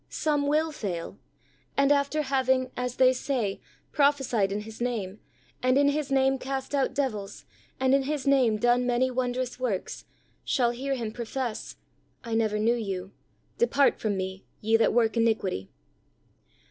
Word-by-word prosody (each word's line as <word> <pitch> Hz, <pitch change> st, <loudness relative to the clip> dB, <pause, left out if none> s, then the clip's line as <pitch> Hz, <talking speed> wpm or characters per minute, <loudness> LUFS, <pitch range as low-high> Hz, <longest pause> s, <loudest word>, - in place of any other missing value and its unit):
— -, -, -42 dB, 0.2 s
some 295 Hz, -2 st, +2 dB
will 310 Hz, +2 st, +2 dB
fail, 185 Hz, -, -5 dB, 0.6 s
and 275 Hz, 0 st, +4 dB
after 285 Hz, +2 st, +2 dB
having, 260 Hz, -2 st, +1 dB
as 250 Hz, 0 st, -3 dB
they 255 Hz, 0 st, +5 dB
say, 245 Hz, -6 st, -2 dB, 0.3 s
prophesied 270 Hz, -9 st, +2 dB
in 205 Hz, +1 st, -2 dB
His 220 Hz, +2 st, -10 dB
name, 215 Hz, -5 st, -2 dB, 0.4 s
and 255 Hz, +1 st, +3 dB
in 285 Hz, 0 st, +5 dB
His 290 Hz, -1 st, -2 dB
name 270 Hz, 0 st, +3 dB
cast 265 Hz, +1 st, -4 dB
out 275 Hz, -2 st, +1 dB
devils, 215 Hz, -9 st, -3 dB, 0.3 s
and 260 Hz, 0 st, +3 dB
in 275 Hz, -, +4 dB
His 285 Hz, 0 st, -3 dB
name 260 Hz, -6 st, +3 dB
done 240 Hz, +2 st, +2 dB
many 250 Hz, +1 st, +2 dB
wondrous 250 Hz, 0 st, -2 dB
works, 235 Hz, -7 st, -3 dB, 0.4 s
shall 240 Hz, -2 st, +2 dB
hear 270 Hz, +3 st, -2 dB
Him 230 Hz, -4 st, -4 dB
profess, 235 Hz, 0 st, -4 dB, 0.5 s
"I 230 Hz, -, -5 dB
never 220 Hz, -2 st, +1 dB
knew 220 Hz, +3 st, +3 dB
you; 195 Hz, -5 st, -4 dB, 0.5 s
depart 285 Hz, -, +3 dB
from 205 Hz, -3 st, -1 dB
Me, 190 Hz, 0 st, -4 dB, 0.2 s
ye 220 Hz, +1 st, +2 dB
that 225 Hz, -, +4 dB
work 230 Hz, -1 st, +2 dB
iniquity." 215 Hz, -, 0 dB
250 Hz, 160 wpm, -27 LUFS, 220-270 Hz, 0.6 s, they